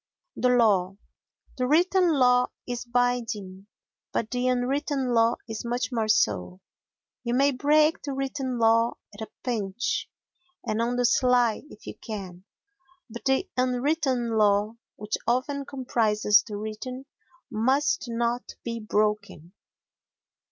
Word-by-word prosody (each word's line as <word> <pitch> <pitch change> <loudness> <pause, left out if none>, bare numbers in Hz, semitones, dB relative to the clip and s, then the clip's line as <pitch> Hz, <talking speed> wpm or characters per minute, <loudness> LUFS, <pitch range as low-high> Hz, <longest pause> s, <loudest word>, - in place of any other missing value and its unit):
The 250 - +1
Law 200 -6 +3 0.6
The 250 - +1
written 355 +4 +3
law 250 -2 +4 0.2
is 245 -1 -4
binding, 230 -6 -1 0.4
but 225 - -2
the 250 0 0
unwritten 260 +1 0
law 230 0 +4
is 220 -1 -5
much 240 +2 -2
more 225 -3 -1
so. 95 - +1 0.6
You 240 0 -1
may 275 +2 +4
break 300 +4 +3
the 280 - -4
written 270 -1 -3
law 230 0 +3 0.2
at 205 - -11
a 220 - -6
pinch 225 -2 -2 0.6
and 215 +1 -1
on 240 +1 0
the 245 0 +1
sly 245 -2 +3
if - - -15
you - - -7
can, 190 -5 -8 0.7
but 235 - -9
the 265 0 +2
unwritten 255 -1 0
law—which 210 +1 0
often 270 +4 0
comprises 220 -6 +2
the 210 -2 -5
written—must 255 +4 -3
not 235 +1 -2
be 230 -1 -4
broken. 210 -5 -1
240 Hz, 125 wpm, -26 LUFS, 215-255 Hz, 0.7 s, law